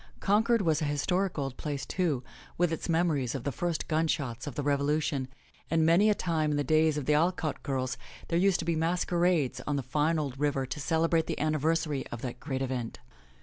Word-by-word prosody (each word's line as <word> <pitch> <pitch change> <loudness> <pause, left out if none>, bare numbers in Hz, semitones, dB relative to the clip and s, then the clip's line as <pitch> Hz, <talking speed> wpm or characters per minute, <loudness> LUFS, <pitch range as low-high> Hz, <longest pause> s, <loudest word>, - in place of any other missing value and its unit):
Concord 220 +2 +3
was 160 -2 +2
an 150 - 0
historic 180 +6 0
old 135 -3 -3
place, 145 -3 -4
too, 160 -9 -1 0.3
with 175 -1 +2
its 165 - -4
memories 160 -7 +1
of 130 - -4
the 140 - -1
first 170 +5 -2
gun 160 +1 +1
shots 130 -6 -2
of 145 - -5
the 145 - -2
Revolution, 145 -1 0 0.4
and 160 0 +3
many 175 +6 +5
a 210 - +3
time 160 -5 0
in 145 - 0
the 145 - +1
days 155 +1 +3
of 145 - -3
the 150 - +3
Alcott 160 0 +1
girls, 130 -3 -2 0.3
there 170 - +2
used 195 0 +4
to - - -4
be 170 -1 +1
masquerades 170 -2 +1
on 145 - 0
the 140 - -1
fine 150 +5 +1
old 140 -4 -3
river 145 -2 +1
to 140 - -5
celebrate 160 +3 +1
the - - -2
anni 155 0 0
versary 155 -2 0
of 120 - -6
that 125 -1 -5
great 135 -2 -3
event. 125 -3 -3
155 Hz, 215 wpm, -29 LUFS, 140-165 Hz, 0.4 s, many